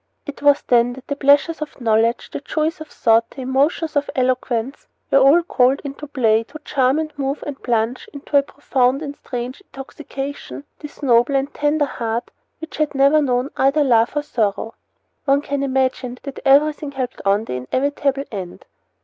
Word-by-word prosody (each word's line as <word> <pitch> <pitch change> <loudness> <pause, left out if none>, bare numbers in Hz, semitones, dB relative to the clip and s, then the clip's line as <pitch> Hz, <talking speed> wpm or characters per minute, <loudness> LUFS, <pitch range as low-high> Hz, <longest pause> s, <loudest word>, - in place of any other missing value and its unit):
It 290 - -8
was 285 -1 +4
then 245 -1 +3
that 260 0 -12
the 285 - -3
pleasures 285 +3 +3
of 305 - -6
knowledge, 230 0 +1
the - - -4
joys 315 +3 -2
of 315 - -7
thought, 230 -4 +2
the 270 - -9
emotions 285 +5 0
of 285 0 0
eloquence, 255 0 -1 0.2
were 275 - +6
all 280 +6 +5
called 260 -4 +2
into 285 +1 -7
play 225 -5 +2
to 295 - -10
charm 265 0 +2
and 310 -1 -3
move 275 +1 -2
and 285 -2 -6
plunge 235 +1 -1
into 285 0 -6
a 280 - +7
profound 275 -1 0
and 285 -1 -6
strange 250 +5 -6
intoxication 280 -2 -8 0.2
this 295 0 -11
noble 245 +1 +3
and 275 +1 -1
tender 295 0 +1
heart 235 -2 -4 0.3
which 320 0 -8
had 305 -2 -1
never 280 +3 +4
known 255 0 0
either 275 +3 +3
love 235 -4 +3
or 295 - 0
sorrow.... 225 -5 -2 0.5
One 280 0 +2
can 280 -1 -2
imagine 260 -2 -1
that 275 -1 -7
everything 290 +1 +3
helped 260 -1 -4
on 200 +2 +2
the - - -5
inevitable 275 - -1
end. 185 -4 -7
275 Hz, 175 wpm, -20 LUFS, 245-290 Hz, 0.5 s, a